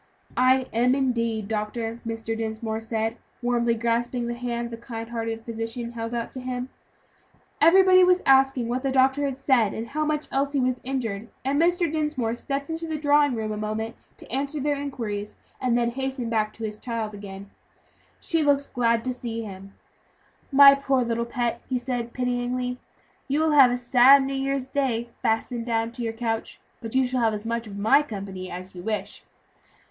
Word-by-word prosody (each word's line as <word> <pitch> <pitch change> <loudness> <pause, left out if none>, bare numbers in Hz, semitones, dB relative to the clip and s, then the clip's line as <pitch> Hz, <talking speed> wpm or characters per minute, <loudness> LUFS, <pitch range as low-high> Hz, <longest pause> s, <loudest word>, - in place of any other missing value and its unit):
"I 255 +1 +4
am, 245 +3 +3
indeed, 230 -5 0
doctor," 225 +2 -3
Mr. 225 0 -3
Dinsmore 220 0 -3
said, 225 0 -2 0.3
warmly 240 -1 +2
grasping 235 +1 -1
the 240 - -2
hand 235 -1 -3
the 230 - -6
kind 230 -1 -7
hearted 225 -1 -4
physician 230 +1 -4
held 230 0 -4
out 235 -1 -3
to 260 - -7
him. 250 0 -4 0.9
Everybody 370 +2 +7
was 365 0 +4
asking 270 -2 +4
what 245 +2 -1
the 270 - -1
doctor 265 +2 +3
had 270 -2 -2
said, 260 -6 +2
and 225 +1 -5
how 305 +2 -1
much 305 0 -1
Elsie 275 +1 0
was 255 -1 0
injured, 230 -5 -3 0.2
and 280 +3 +2
Mr. 350 +2 +2
Dinsmore 300 -7 -1
stepped 275 +3 -4
into 325 0 -4
the 315 -1 -2
drawing 290 -2 +3
room 220 -1 -3
a 210 - -3
moment 215 +2 -3 0.2
to - - -14
answer 280 +4 -2
their 290 +1 +1
inquiries, 225 -8 -4 0.3
and 250 -2 +2
then 235 0 +1
hastened 265 -2 -3
back 215 -1 +1
to 225 - -9
his 210 -1 -4
child 225 -3 -4
again. 200 -1 -9 0.7
She 330 -1 0
looked 285 -2 +3
so 280 - -14
glad 230 -2 +2
to 255 - -2
see 230 -2 -5
him. 195 -1 -10 0.8
"My 275 0 +9
poor 275 -2 +1
little 235 0 -1
pet," 235 -1 -2
he 255 - +1
said, 245 -1 -3
pityingly, 250 0 -2 0.5
"you 285 +2 +1
will 315 0 +2
have 275 -4 +7
a 245 - 0
sad 250 +3 +6
New 270 +1 -3
Year's 270 -1 -1
Day, 245 -4 -1
fastened 230 +1 -1
down 225 0 0
to 245 +1 -7
your 230 -1 -1
couch; 225 -1 -3 0.2
but 225 +1 -6
you 260 0 +4
shall 250 0 -1
have 220 -2 +2
as 210 +1 -7
much 230 0 -2
of 200 -1 -8
my 220 +8 +5
company 195 -7 -6
as 185 +1 -8
you 180 - -8
wish." 210 0 -4
240 Hz, 190 wpm, -25 LUFS, 225-270 Hz, 0.9 s, My